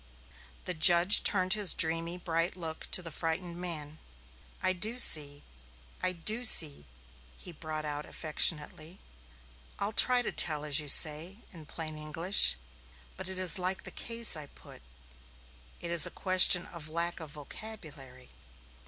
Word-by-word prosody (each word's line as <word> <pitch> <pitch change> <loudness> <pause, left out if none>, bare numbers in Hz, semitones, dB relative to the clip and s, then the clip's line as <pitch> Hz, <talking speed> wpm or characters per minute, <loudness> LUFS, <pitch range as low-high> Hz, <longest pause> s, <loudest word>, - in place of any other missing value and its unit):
The 180 - -5
judge 175 +4 +4
turned 185 -2 +3
his 210 -4 +2
dreamy, 165 +2 -1
bright 170 -1 -6
look 160 -2 -10
toward 180 - -3
the 165 - -8
frightened 170 +2 -7
man. 155 -4 -9 0.6
"I 185 - -2
do 215 +6 -3
see 145 - +1 0.6
I 185 - -4
do 215 +7 -2
see," 150 - +4 0.5
he 180 - -11
brought 155 -1 -10
out 150 0 -8
affectionately. 155 +2 -5 0.8
"I'll 200 +1 -6
try 250 +2 +4
to - - -7
tell, 150 -3 +5
as 150 0 0
you 150 - -8
say, 160 +9 +4
in 160 -4 -16
plain 155 -1 -10
English. 155 - 0 0.6
But - - -10
it 190 - -8
is 185 0 +3
like 185 +1 -4
the - - -9
case 230 -4 -3
I 150 -2 -9
put - - -20 1.0
it 170 - -10
is 170 -3 +5
a - - -14
question 185 -1 +3
of 160 -3 -13
lack 170 +2 -7
of 160 -2 -13
vocabulary. 145 -6 -14
165 Hz, 150 wpm, -26 LUFS, 155-185 Hz, 1.0 s, tell